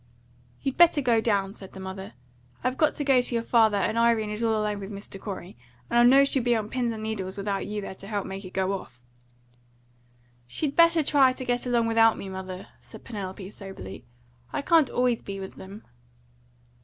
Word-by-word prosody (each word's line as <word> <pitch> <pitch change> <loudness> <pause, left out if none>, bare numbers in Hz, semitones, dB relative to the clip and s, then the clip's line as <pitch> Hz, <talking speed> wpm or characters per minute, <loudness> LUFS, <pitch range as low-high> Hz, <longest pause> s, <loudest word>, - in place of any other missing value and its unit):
"You 270 - 0
better 340 0 +5
go 240 -5 +2
down," 200 -3 0
said 195 -3 -11
the 190 - -9
mother. 190 -4 -7 0.5
"I've 255 0 0
got 305 +2 +2
to 290 - -2
go 270 -3 +4
to 245 - 0
your 230 - 0
father, 220 -3 +4
and 220 +4 0
Irene 230 -2 +2
is 210 +2 -4
all 225 -2 +1
alone 210 -1 -1
with 195 0 -7
Mr. 200 -1 -9
Corey; 190 -3 -7 0.4
and 235 - +4
I - - +7
know 265 +3 +7
she'll 275 -1 0
be 240 0 +2
on 215 -1 -2
pins 245 -2 0
and 220 -1 -6
needles 200 -4 -4
without 200 0 -2
you're 210 0 -4
there - - -6
to 195 +1 -12
help 205 -2 -2
make 195 +1 -6
it 185 - -8
go 190 +1 0
off." 125 -10 -8 1.4
"She'd 280 - -2
better 335 -1 +5
try 275 -3 +4
to 255 0 -7
get 245 0 -1
along 240 -2 +2
without 225 0 +4
me, 195 - -7
mother," 190 0 -7
said - - -13
Penelope 195 -3 -6
soberly. 190 - -9 0.5
"I 285 - -3
can't 325 -5 +4
always 245 -2 +1
be 195 -1 -6
with 190 0 -8
them." 200 +3 -10
220 Hz, 205 wpm, -26 LUFS, 195-245 Hz, 1.4 s, I